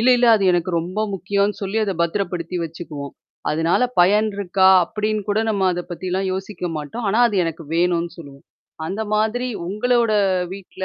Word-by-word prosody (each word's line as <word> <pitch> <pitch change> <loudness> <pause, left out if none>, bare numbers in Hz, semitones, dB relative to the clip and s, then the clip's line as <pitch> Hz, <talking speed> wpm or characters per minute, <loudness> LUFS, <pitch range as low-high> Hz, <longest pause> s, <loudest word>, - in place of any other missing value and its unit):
இல்ல, 240 - +3
இல்ல 245 - +3
அது 200 - -1
எனக்கு 175 +1 0
ரொம்ப 180 +5 -4
முக்கியம்னு 200 +2 -1
சொல்லி 195 +2 -3
அத 195 - -1
பத்திரப்படுத்தி 175 -1 -2
வச்சுக்குவோம். 155 -3 -7 0.4
அதனால 165 +8 +1 0.2
பயன் 210 +5 +4
இருக்கா, 190 -1 +3 0.2
அப்படின்னு 215 +3 -2
கூட 205 +1 +1
நம்ம 200 -3 +1
அத 175 - -3
பத்திலாம் 185 +2 -2
யோசிக்க 190 -1 -4
மாட்டோம். 155 +11 -5
ஆனா, 215 +4 +1
அது 210 - -3
எனக்கு 165 0 -5
வேணும்னு 170 0 +1
சொல்லுவோம். 140 -3 -12 0.4
அந்த 195 +5 -4
மாதிரி 220 +4 0 0.2
உங்களோட 230 +4 +1 0.4
வீட்ல 190 -1 -7
190 Hz, 160 wpm, -21 LUFS, 170-210 Hz, 0.4 s, பயன்